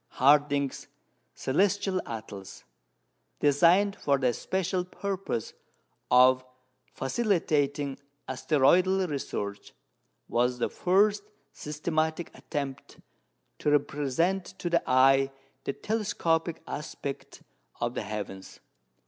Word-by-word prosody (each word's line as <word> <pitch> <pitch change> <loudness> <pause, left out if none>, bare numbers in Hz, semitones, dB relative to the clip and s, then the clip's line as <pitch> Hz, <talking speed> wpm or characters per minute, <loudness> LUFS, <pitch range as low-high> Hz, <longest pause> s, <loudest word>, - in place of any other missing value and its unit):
Harding's 140 0 +2 0.5
"Celestial 195 +5 +1
Atlas," 100 -4 -8 0.8
designed 170 +8 +4
for 140 -1 +1
the 125 -2 +1
special 185 - -1
purpose 190 - -4 0.6
of 130 +1 +6 0.5
facilitating 145 - 0 0.3
asteroidal 175 +8 +3
research, 105 -9 -5 0.5
was 125 +1 +1
the 120 - 0
first 200 +3 +2 0.3
systematic 155 +2 -2
attempt 140 -3 -5 0.6
to - - 0
represent 150 +6 +1
to 175 - -3
the 170 - +3
eye 135 +1 +5 0.4
the 140 - -1
telescopic 170 -7 -1
aspect 140 -2 -6 0.4
of 120 0 -1
the - - -3
heavens. 100 -2 -7
145 Hz, 90 wpm, -28 LUFS, 130-180 Hz, 0.8 s, of